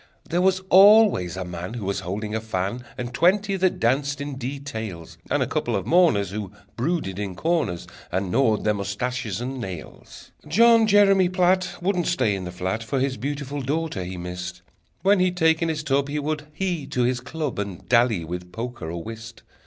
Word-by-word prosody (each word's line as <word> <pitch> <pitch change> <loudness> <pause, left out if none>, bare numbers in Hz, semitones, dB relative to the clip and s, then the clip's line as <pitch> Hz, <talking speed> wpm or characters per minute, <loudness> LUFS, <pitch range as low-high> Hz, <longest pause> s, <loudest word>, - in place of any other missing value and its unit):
There 175 +2 0
was 185 0 +3
always 195 - +6
a 95 - -3
man 90 +5 -6
Who 110 -5 -5
was 100 0 -1
holding 100 +4 -4
her 110 - -1
fan, 110 +2 -3
And 120 0 -5
twenty 195 - +3
that 185 -1 +1
danced 140 +4 +1
in 145 -1 -4
details, 115 - -6
And - - +2
a - - -1
couple - - -1
of - - -2
mourners, 155 - +3
Who 100 -2 -5 0.2
brooded 120 - -2
in 100 -3 -4
corners, 155 - -1 0.3
And 95 0 -1
gnawed 115 -3 +2
their 105 - +2
mustaches 105 +2 -3
and 130 +1 -4
nails. 90 -7 -9 0.2
John 230 +6 +5
Jeremy 195 -3 +5
Platt 185 0 +2
Wouldn't 180 -2 +1
stay 145 - +1
in 95 -2 -4
the 90 - -5
flat, 95 +4 -3
For 130 +4 -2
his 130 0 -1
beautiful 140 +2 -4
daughter 145 - -2
he 90 +1 -6
missed: 90 0 -6 0.4
When 200 +1 +4
he'd 180 -1 +1
taken 160 0 +3
his 155 -1 -2
tub, 140 -1 +1
He 150 - -2
would 150 0 -3
hie 175 -7 -1
to 125 -3 0
his 125 0 +1
club, 140 -1 -4
And 100 -4 -5
dally 115 -7 +3
with 90 +2 -6
poker 120 -7 -5
or 85 0 -5
whist. 115 0 -9
125 Hz, 190 wpm, -24 LUFS, 100-165 Hz, 0.4 s, always